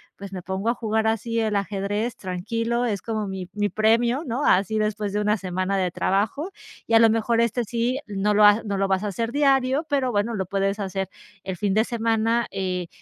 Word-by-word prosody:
pues 200 Hz, -1 st, -9 dB
me 185 Hz, -, -5 dB
pongo 190 Hz, +4 st, -2 dB
a -, -, +3 dB
jugar 220 Hz, -1 st, -1 dB
así, 230 Hz, +1 st, 0 dB
el 215 Hz, -2 st, 0 dB
ajedrez, 205 Hz, +3 st, -2 dB
tranquilo, 230 Hz, +6 st, -2 dB
es 205 Hz, -4 st, -1 dB
como 215 Hz, -2 st, -2 dB
mi 190 Hz, -2 st, -5 dB
mi 205 Hz, 0 st, 0 dB
premio", 235 Hz, +6 st, +2 dB
¿no?, 255 Hz, +3 st, -2 dB
así, 205 Hz, +4 st, +3 dB
después 210 Hz, -1 st, -1 dB
de 210 Hz, -, 0 dB
una 210 Hz, +1 st, +2 dB
semana 185 Hz, +1 st, -2 dB
de 185 Hz, -2 st, 0 dB
trabajo. 215 Hz, -, -1 dB, 0.4 s
Y, 230 Hz, -, -2 dB
a -, -, +8 dB
lo 225 Hz, -1 st, +6 dB
mejor 230 Hz, +1 st, +1 dB
este, 235 Hz, +1 st, +1 dB
sí, 240 Hz, +4 st, -1 dB
no 205 Hz, +1 st, 0 dB
lo 210 Hz, +1 st, +4 dB
ha 205 Hz, +2 st, +6 dB
no 200 Hz, -3 st, -2 dB
lo 195 Hz, 0 st, +1 dB
vas 190 Hz, +1 st, 0 dB
a 210 Hz, -, -1 dB
hacer 230 Hz, +4 st, -2 dB
diario, 275 Hz, +1 st, +2 dB
pero 270 Hz, -4 st, +1 dB
bueno, 210 Hz, +2 st, 0 dB
lo 190 Hz, -2 st, -2 dB
puedes 195 Hz, +1 st, -1 dB
hacer 190 Hz, -1 st, -3 dB, 0.3 s
el 190 Hz, -2 st, -5 dB
fin 200 Hz, 0 st, 0 dB
de 220 Hz, -, +4 dB
semana, 230 Hz, 0 st, 0 dB
eh, 180 Hz, -2 st, -2 dB
215 Hz, 215 wpm, -24 LUFS, 195-230 Hz, 0.4 s, a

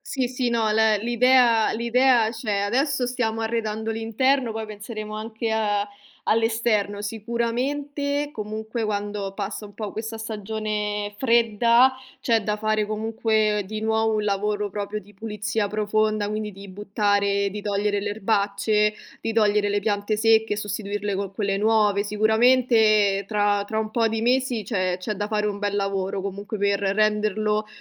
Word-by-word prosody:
Sì, 265 Hz, -3 st, -2 dB
sì, 250 Hz, -1 st, -1 dB
no, 225 Hz, -2 st, +1 dB
l 220 Hz, -1 st, +3 dB
l'idea 240 Hz, -1 st, +4 dB
l'idea 235 Hz, 0 st, +3 dB
c'è. 220 Hz, -3 st, -2 dB
Adesso 255 Hz, +4 st, 0 dB
stiamo 225 Hz, -3 st, -1 dB
arredando 220 Hz, -1 st, -2 dB
l'interno, 230 Hz, +3 st, +1 dB
poi 220 Hz, 0 st, -4 dB
penseremo 215 Hz, 0 st, -7 dB
anche 220 Hz, +1 st, -4 dB
a 205 Hz, -2 st, 0 dB, 0.4 s
all'esterno. 220 Hz, -2 st, +1 dB
Sicuramente 270 Hz, +7 st, -2 dB
comunque 220 Hz, +2 st, -5 dB
quando 205 Hz, -1 st, -3 dB
passa 205 Hz, +1 st, -5 dB
un 205 Hz, -, -16 dB
po' 210 Hz, -2 st, -5 dB
questa 220 Hz, +1 st, -5 dB
stagione 210 Hz, -1 st, -3 dB
fredda 235 Hz, +1 st, +4 dB, 0.3 s
c'è 225 Hz, -3 st, +2 dB
da 210 Hz, 0 st, -1 dB
fare 215 Hz, 0 st, 0 dB
comunque 215 Hz, -1 st, 0 dB
di 215 Hz, +2 st, -5 dB
nuovo 220 Hz, 0 st, +1 dB
un 210 Hz, -1 st, 0 dB
lavoro 205 Hz, 0 st, -1 dB
proprio 205 Hz, +1 st, -4 dB
di 205 Hz, +2 st, -18 dB
pulizia 210 Hz, 0 st, -3 dB
profonda, 215 Hz, 0 st, 0 dB
quindi 215 Hz, 0 st, -3 dB
di 200 Hz, +1 st, -11 dB
buttare 200 Hz, 0 st, 0 dB
di 210 Hz, +2 st, -6 dB
togliere 205 Hz, 0 st, 0 dB
le 205 Hz, -, -3 dB
erbacce, 210 Hz, 0 st, +1 dB, 0.3 s
di 225 Hz, -, -2 dB
togliere 210 Hz, -2 st, +3 dB
le 205 Hz, 0 st, 0 dB
piante 205 Hz, 0 st, -1 dB
secche, 220 Hz, -1 st, +3 dB
sostituirle 205 Hz, -1 st, -3 dB
co' 195 Hz, 0 st, -3 dB
quelle 195 Hz, 0 st, -1 dB
nuove. 210 Hz, -1 st, +2 dB
Sicuramente 215 Hz, -2 st, +3 dB
tra 205 Hz, -1 st, +1 dB
tra 220 Hz, +1 st, -2 dB
un 215 Hz, 0 st, -2 dB
po' 230 Hz, 0 st, +2 dB
di 225 Hz, 0 st, -2 dB
mesi 250 Hz, -2 st, +1 dB
c'è 185 Hz, -3 st, -1 dB
c'è 200 Hz, +4 st, -3 dB
da 205 Hz, +1 st, -3 dB
fare 210 Hz, -1 st, 0 dB
un 205 Hz, -1 st, -2 dB
bel 205 Hz, 0 st, -1 dB
lavoro 195 Hz, -1 st, -1 dB
comunque, 200 Hz, +2 st, -5 dB
per 200 Hz, 0 st, +1 dB
renderlo 210 Hz, +1 st, +1 dB
215 Hz, 150 wpm, -24 LUFS, 205-225 Hz, 0.4 s, l'idea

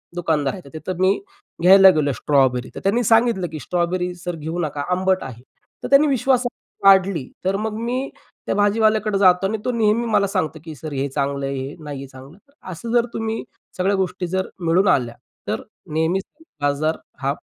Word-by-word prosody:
दुकानदार 160 Hz, -5 st, 0 dB
आहे, 185 Hz, -, -8 dB
तर 140 Hz, -, -12 dB
तिथं 175 Hz, +3 st, -5 dB
मी 190 Hz, +1 st, +3 dB, 0.4 s
घ्यायला 190 Hz, +2 st, +8 dB
गेलो 145 Hz, -2 st, +1 dB
स्ट्रॉबेरी, 130 Hz, -1 st, +1 dB
तर -, -, -5 dB
त्यांनी 225 Hz, +5 st, +2 dB
सांगितलं, 225 Hz, -5 st, +3 dB
की 155 Hz, -, -6 dB
"स्ट्रॉबेरी 180 Hz, +2 st, -1 dB
सर 175 Hz, 0 st, -5 dB
घेऊ 160 Hz, +3 st, -5 dB
नका 150 Hz, -3 st, -2 dB
आंबट 185 Hz, +1 st, +1 dB
आहे." 120 Hz, -2 st, -9 dB, 0.4 s
तर -, -, -2 dB
त्यांनी 280 Hz, +2 st, +6 dB
विश्वासहार्ता 250 Hz, -6 st, 0 dB
वाढली, 190 Hz, -7 st, +3 dB, 0.2 s
तर 190 Hz, -, +1 dB
मग 215 Hz, +1 st, -2 dB
मी 245 Hz, +4 st, -2 dB, 0.4 s
त्या -, -, -1 dB
भाजीवाल्याकडं 215 Hz, 0 st, +2 dB
जातो 190 Hz, -1 st, +4 dB
आणि 220 Hz, +2 st, -2 dB
तो 250 Hz, -, +1 dB
नेहमी 230 Hz, 0 st, +1 dB
मला 210 Hz, -3 st, +2 dB
सांगतो, 160 Hz, -4 st, -2 dB
की 160 Hz, -2 st, -8 dB
"सर 155 Hz, +2 st, -8 dB
हे 135 Hz, +1 st, -1 dB
चांगलं 140 Hz, 0 st, -2 dB
आहे, 140 Hz, -, -3 dB
हे 135 Hz, +2 st, -5 dB
नाही 145 Hz, -2 st, -6 dB
आहे 135 Hz, -, -8 dB
चांगलं." 135 Hz, +6 st, -14 dB, 0.3 s
असं 230 Hz, +7 st, -6 dB
जर 240 Hz, -1 st, +4 dB
तुम्ही 225 Hz, 0 st, -3 dB, 0.3 s
सगळ्या 195 Hz, +2 st, +1 dB
गोष्टी 185 Hz, -1 st, -2 dB
जर 190 Hz, +2 st, -1 dB, 0.2 s
मिळून 180 Hz, +4 st, +3 dB
आल्या, 120 Hz, -6 st, +2 dB, 0.3 s
तर -, -, -2 dB, 0.3 s
नेहमीच 165 Hz, +5 st, +1 dB, 0.4 s
बाजार 145 Hz, +3 st, 0 dB, 0.2 s
हा 135 Hz, +1 st, 0 dB
180 Hz, 185 wpm, -21 LUFS, 150-210 Hz, 0.4 s, घ्यायला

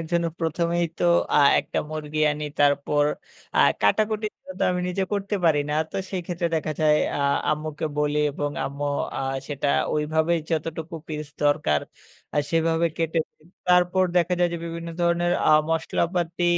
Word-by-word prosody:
এর 165 Hz, -, -5 dB
জন্য 170 Hz, 0 st, +2 dB
১ম 165 Hz, +1 st, 0 dB
এই 170 Hz, -, +2 dB
তো -, -, 0 dB, 0.3 s
আ -, -, +7 dB, 0.2 s
একটা -, -, -4 dB
মুরগি 155 Hz, 0 st, -4 dB
আনি। 150 Hz, +1 st, -5 dB, 0.2 s
তারপর 145 Hz, +1 st, +3 dB, 0.5 s
আ -, -, +3 dB, 0.2 s
কাটাকুটি 215 Hz, -, +2 dB, 0.3 s
তো -, -, -1 dB
আমি 180 Hz, 0 st, -1 dB
নিজে 190 Hz, +2 st, -1 dB
করতে 200 Hz, 0 st, -1 dB
পারি 150 Hz, -3 st, +4 dB
না। 150 Hz, -, 0 dB, 0.2 s
তো -, -, -5 dB
সেই 190 Hz, -, -2 dB
ক্ষেত্রে 175 Hz, -1 st, -1 dB
দেখা 155 Hz, 0 st, -2 dB
যায় 150 Hz, -1 st, +5 dB, 0.2 s
আ -, -, -2 dB, 0.3 s
আম্মুকে 155 Hz, +1 st, -2 dB
বলি 150 Hz, 0 st, +1 dB
এবং 145 Hz, +1 st, -2 dB
আম্মু 140 Hz, +1 st, -4 dB, 0.3 s
আ -, -, -2 dB, 0.3 s
সেটা 145 Hz, -1 st, -2 dB, 0.3 s
ওইভাবেই 160 Hz, +2 st, +1 dB
যতটুকু 160 Hz, +1 st, -3 dB
piece 150 Hz, -1 st, -5 dB
দরকার 75 Hz, -, +2 dB, 0.6 s
আ -, -, +4 dB
সেভাবে 165 Hz, 0 st, +2 dB
কেটে। 165 Hz, 0 st, 0 dB, 0.5 s
তারপর 180 Hz, +1 st, +4 dB
দেখা 175 Hz, +1 st, +3 dB
যায় 175 Hz, -, +3 dB
যে, 170 Hz, -, -3 dB
বিভিন্ন 170 Hz, 0 st, -6 dB
ধরনের 175 Hz, 0 st, +2 dB, 0.2 s
আ -, -, +6 dB, 0.2 s
মশলাপাতি 170 Hz, +2 st, -1 dB
165 Hz, 165 wpm, -24 LUFS, 150-175 Hz, 0.6 s, আ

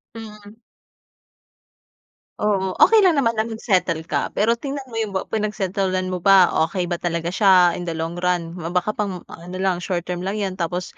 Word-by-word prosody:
Mhm. 210 Hz, -2 st, -11 dB, 1.9 s
Oo. 195 Hz, -3 st, 0 dB
Okey 440 Hz, -3 st, +6 dB
lang 360 Hz, -, +5 dB
naman 230 Hz, -6 st, +1 dB
ang 220 Hz, +1 st, -1 dB
mag-settle 185 Hz, -7 st, 0 dB
ka. -, -, -1 dB
Pero 230 Hz, +3 st, +2 dB
tingnan 275 Hz, +3 st, -5 dB
mo 225 Hz, -, -7 dB
'yong 220 Hz, -3 st, -2 dB
ba 190 Hz, -, 0 dB
pinag-settle-an 195 Hz, -3 st, -1 dB
mo 185 Hz, -, -2 dB
ba. 190 Hz, 0 st, +5 dB, 0.2 s
Okey 180 Hz, 0 st, -3 dB
ba 175 Hz, -, -1 dB
talaga 170 Hz, -1 st, -2 dB
siya 185 Hz, -2 st, +4 dB
in 175 Hz, -, -5 dB
the 170 Hz, -, -3 dB
long 165 Hz, +1 st, -4 dB
run? 175 Hz, -1 st, -1 dB
Ma 170 Hz, 0 st, -5 dB
baka 180 Hz, +3 st, 0 dB
pang 200 Hz, -4 st, -3 dB
ano 175 Hz, +2 st, -9 dB
lang, 190 Hz, -2 st, +1 dB
short 175 Hz, 0 st, -2 dB
term 180 Hz, 0 st, -3 dB
lang 205 Hz, +2 st, -2 dB
'yan. 190 Hz, -2 st, -3 dB
Tapos 175 Hz, 0 st, -4 dB
190 Hz, 185 wpm, -21 LUFS, 175-210 Hz, 1.9 s, Okey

